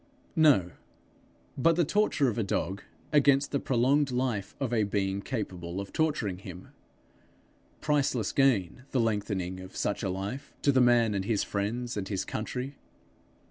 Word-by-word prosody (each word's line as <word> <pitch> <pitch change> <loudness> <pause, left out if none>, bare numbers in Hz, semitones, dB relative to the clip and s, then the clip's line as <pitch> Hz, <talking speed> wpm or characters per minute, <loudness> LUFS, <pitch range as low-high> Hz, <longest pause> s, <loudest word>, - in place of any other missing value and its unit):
No, 145 - +4 0.8
but 165 +5 +3
the 175 -1 +2
torture 205 -6 +2
of 120 -1 -1
a - - +1
dog 95 0 -2 0.3
against 140 -1 +4
the 140 - +1
prolonged 135 +4 +2
life 125 -6 -2
of 130 -3 -2
a 115 - +3
being 100 -1 -1
capable 95 -7 -4
of 100 0 -7
torturing 135 - 0
him. 90 -2 -10 1.1
Priceless 140 -7 +1
gain, 130 -7 +2
the 130 - 0
lengthening 100 -5 -1
of 95 0 -10
such 105 - -1
a 100 - -1
life, 100 +10 -5
to 140 - +5
the 130 -1 +4
man 120 -3 +4
and 95 -1 -2
his 105 -1 +1
friends 115 +4 -3
and 95 -2 -3
his 100 -2 -2
country! 125 +5 -4
115 Hz, 155 wpm, -29 LUFS, 100-135 Hz, 1.1 s, to